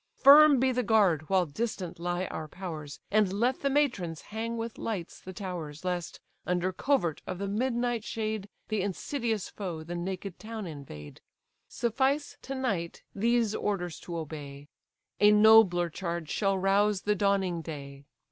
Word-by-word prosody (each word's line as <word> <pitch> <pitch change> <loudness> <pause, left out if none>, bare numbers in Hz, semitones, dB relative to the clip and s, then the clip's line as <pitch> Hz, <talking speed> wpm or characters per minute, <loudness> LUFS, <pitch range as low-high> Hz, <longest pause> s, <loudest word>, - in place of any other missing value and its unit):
Firm 285 0 +8
be 260 +1 +3
the 250 0 0
guard, 200 -9 +3
while 190 -2 +3
distant 180 +1 -4
lie 175 +1 -1
our 155 - -5
powers, 155 -5 -7
And 210 -2 +3
let 240 +6 0
the 280 - +1
matrons 235 - 0
hang 230 +2 -4
with 230 0 -5
lights 190 -7 -4
the 185 - -9
towers; 175 -5 -6
Lest, 180 -2 -3 0.2
under 180 +1 0
covert 180 - 0
of 185 - -4
the 200 +2 -3
midnight 240 +2 0
shade, 215 -2 -3 0.2
The 215 -2 0
insidious 220 +2 -2
foe 175 -6 -6
the 170 +2 -6
naked 185 +1 -5
town 220 -1 -6
invade. 140 - -9 0.5
Suffice, 265 +5 0
to 270 - -5
night, 200 -11 -2
these 230 +1 +2
orders 180 -6 -2
to 170 -1 -6
obey; 145 -2 -7 0.5
A 205 - +7
nobler 210 -5 +6
charge 170 -3 -4
shall 195 -2 +1
rouse 195 +1 +2
the 210 - +1
dawning 195 -4 +1
day. 140 -3 -8
195 Hz, 155 wpm, -29 LUFS, 170-225 Hz, 0.5 s, Firm